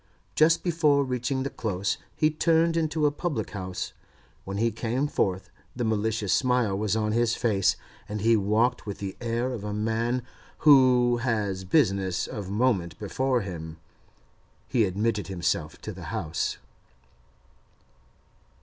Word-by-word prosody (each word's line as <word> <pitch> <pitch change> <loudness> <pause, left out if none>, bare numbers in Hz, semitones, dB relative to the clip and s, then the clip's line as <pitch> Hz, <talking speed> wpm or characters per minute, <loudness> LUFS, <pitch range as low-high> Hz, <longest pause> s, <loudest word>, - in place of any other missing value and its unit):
Just 160 +2 +4
before 155 -5 +3
reaching 130 +1 -1
the 140 - -3
Close 100 -3 -2 0.2
he 155 0 +2
turned 165 +1 +2
into 155 -2 +1
a 145 - +4
public 145 - -3
house; 95 -2 -5 0.5
when 95 +1 -4
he 115 +2 +2
came 120 +5 -1
forth 95 -8 -1 0.2
the 120 - -2
malicious 110 -2 0
smile 125 -6 +2
was 105 +1 0
on 105 -1 0
his 115 0 +2
face, 100 -5 +2 0.3
and 105 0 -3
he 115 +2 +4
walked 110 +4 +1
with 100 - -4
the 95 -1 -5
air 120 +2 -1
of 110 -5 -6
a 105 0 -3
man 115 +3 0 0.4
who 125 -4 +6
has 105 -6 -1
business 95 -1 +2
of 105 -6 -6
moment 100 -7 0
before 125 +5 0
him. 80 -5 -7 0.9
He 120 -4 +2
admitted 105 +3 -1
himself 85 -4 -2
to - - -5
the - - -9
house. 80 +1 -2
110 Hz, 140 wpm, -26 LUFS, 100-130 Hz, 0.9 s, who